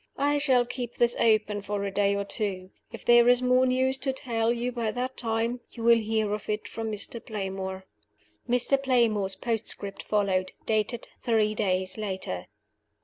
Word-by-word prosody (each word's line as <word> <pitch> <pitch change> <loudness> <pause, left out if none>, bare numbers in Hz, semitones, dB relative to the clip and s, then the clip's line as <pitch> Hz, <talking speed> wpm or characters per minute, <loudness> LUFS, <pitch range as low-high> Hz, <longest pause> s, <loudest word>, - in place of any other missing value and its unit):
I 290 +1 +2
shall 260 -4 +3
keep 245 -1 -5
this 240 0 +4
open 215 -2 +2
for 200 0 -3
a 200 - -2
day 200 0 +2
or 200 - -1
two. 195 -3 0 0.2
If 230 - -10
there 240 0 +6
is 245 0 +5
more 255 +1 +4
news 260 +1 +1
to 270 +1 0
tell 230 -3 -1
you 240 +1 -1
by 235 -2 -2
that 250 +4 -3
time 230 +1 -1
you 230 - -9
will 235 0 +6
hear 220 -1 0
of 210 0 -5
it 210 0 -2
from 225 -1 -4
Mr. 215 +2 -2
Playmore." 190 -2 -5 0.6
Mr. 250 +3 +2
Playmore's 225 -7 +2
postscript 210 -2 -3
followed, 190 -3 0
dated 220 +2 -1 0.2
three 220 -2 +2
days 185 -1 -1
later. 190 - -3
225 Hz, 170 wpm, -27 LUFS, 200-245 Hz, 0.6 s, there